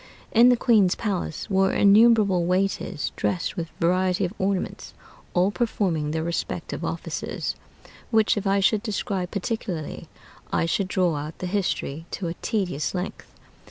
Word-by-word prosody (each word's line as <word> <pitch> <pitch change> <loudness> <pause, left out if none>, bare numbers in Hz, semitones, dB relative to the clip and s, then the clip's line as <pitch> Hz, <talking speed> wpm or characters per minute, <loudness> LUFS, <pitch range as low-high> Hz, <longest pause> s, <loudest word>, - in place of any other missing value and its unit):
In 240 +2 +7
the 245 - +4
queen's 215 -7 +4
palace 195 -7 -3
were 195 -1 +2
innumerable 205 -3 +5
waiters, 185 -4 -1
dressed 180 - -1
with 170 -3 -4
variety 185 +2 +2
of 180 - -4
ornaments, 190 -1 -2 0.4
all 180 +3 +3
performing 190 -10 0
their 160 +1 -1
respective 170 +1 -3
offices; - - -3 0.5
which, 220 -1 +3
if 205 -1 -2
I 195 0 +3
should 205 +3 +3
describe 200 -4 -2
particularly, 195 -6 -4 0.4
I - - +1
should 185 +3 0
draw 180 -4 +1
out 150 +2 -6
the - - -5
history 175 -5 -2
to 190 - -5
a 165 - -2
tedious 185 -8 -1
length. 180 +1 -5
190 Hz, 145 wpm, -25 LUFS, 175-205 Hz, 0.5 s, In